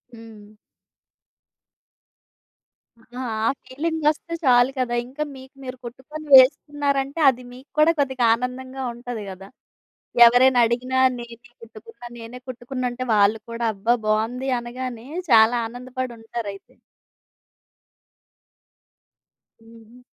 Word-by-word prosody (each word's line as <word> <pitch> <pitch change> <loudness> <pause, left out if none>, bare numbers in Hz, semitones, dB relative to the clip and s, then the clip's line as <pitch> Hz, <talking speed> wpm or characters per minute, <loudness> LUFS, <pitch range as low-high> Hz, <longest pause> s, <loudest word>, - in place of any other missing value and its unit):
హ్మ్. 220 -2 -14 2.5
ఆ! 230 - -24 0.5
ఆ - - +4
ఫీలింగొస్తే 315 +3 -2
చాలు 245 +1 +5
కదా! 240 -1 -1
ఇంకా 275 +5 -5
మీకు 265 +1 -14
మీరు 255 0 -7
కుట్టుకొని 265 +6 -9
వేస్తున్నారంటే, 280 +1 +3
అది 250 -1 -4
మీకు 260 +3 -15
కూడా 315 +2 +6
కొద్దిగా 265 -3 0
ఆనందంగా 255 +2 -6
ఉంటది 240 -3 -7
గదా! 195 +1 -10 0.8
ఎవరైనా 245 +1 +5
అడిగినా 255 +2 -1 0.2
నేనే 235 0 -11
కుట్టుకున్నా, 425 - -13
నేనే 230 +2 -9
కుట్టుకున్నానంటే 250 0 -4
వాళ్ళు 210 +1 +3
కూడా 230 0 -3
అబ్బా 225 +5 +1
బావుంది 230 +5 -1
అనగానే, 240 0 -7 0.2
చాలా 225 +1 +6
ఆనందపడుంటారు 240 -3 -6
అయితే. 195 - -17 2.9
హుహు. 230 +1 -17
250 Hz, 100 wpm, -22 LUFS, 230-265 Hz, 2.9 s, కూడా